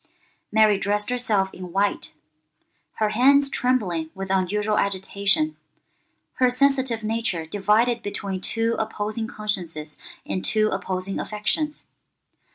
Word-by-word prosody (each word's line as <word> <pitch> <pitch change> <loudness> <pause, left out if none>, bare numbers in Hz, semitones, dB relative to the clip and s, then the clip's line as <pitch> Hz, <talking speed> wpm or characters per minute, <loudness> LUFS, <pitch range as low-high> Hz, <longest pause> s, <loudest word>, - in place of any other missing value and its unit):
Mary 215 -2 +5
dressed 205 +3 -1
herself 215 -6 0
in 180 -1 -8
white—her 155 0 -4
hands 275 +5 +4
trembling 190 -11 0
with 190 0 -4
unusual 205 +3 +1
agitation, 200 +9 +1 0.8
her 255 -1 +4
sensitive 260 -3 +2
nature 215 -7 -1
divided 210 +7 +2
between 200 -3 -4
two 230 +2 0
opposing 215 0 -2
consciences 175 -9 -4 0.3
and 185 - -3
two 215 -1 +2
opposing 190 0 -3
affections. 295 +9 -1
210 Hz, 105 wpm, -24 LUFS, 190-230 Hz, 0.8 s, Mary